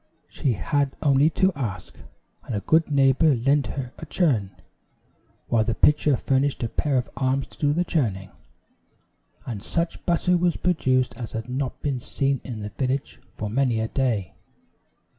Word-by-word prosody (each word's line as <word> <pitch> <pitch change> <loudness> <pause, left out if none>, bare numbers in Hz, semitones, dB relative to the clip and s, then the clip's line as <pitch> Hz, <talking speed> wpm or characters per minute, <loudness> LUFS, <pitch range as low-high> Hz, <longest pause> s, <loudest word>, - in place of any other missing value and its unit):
She 135 - -1
had 135 +8 -1
only 140 +1 +4
to 190 0 +3
ask, 110 - -5 0.5
and 120 - -4
a - - 0
good 160 +6 +3
neighbor 140 +1 +4
lent 135 +4 +2
her 130 -2 -5
a - - -7
churn, 130 - +1 1.0
while 115 -2 +2
the 110 0 -1
pitcher 150 -2 +4
furnished 135 +1 0
a 115 - -1
pair 140 +2 0
of 125 - 0
arms 130 +1 0
to - - -19
do 145 -1 +2
the 170 +4 +1
churning, 105 - -1 1.1
and 110 -5 -5
such 170 +9 -2
butter 180 +1 +2
was 175 0 +1
produced 130 -9 +1
as 115 -2 -6
had 115 +2 -5
not 130 +1 -3
been 140 -3 -1
seen 135 +2 -1
in 115 -4 -6
the 105 - -5
village 130 +7 -3 0.2
for 105 - -4
many 120 +1 +1
a 110 0 -1
day. 120 -9 -1
135 Hz, 165 wpm, -24 LUFS, 115-145 Hz, 1.1 s, only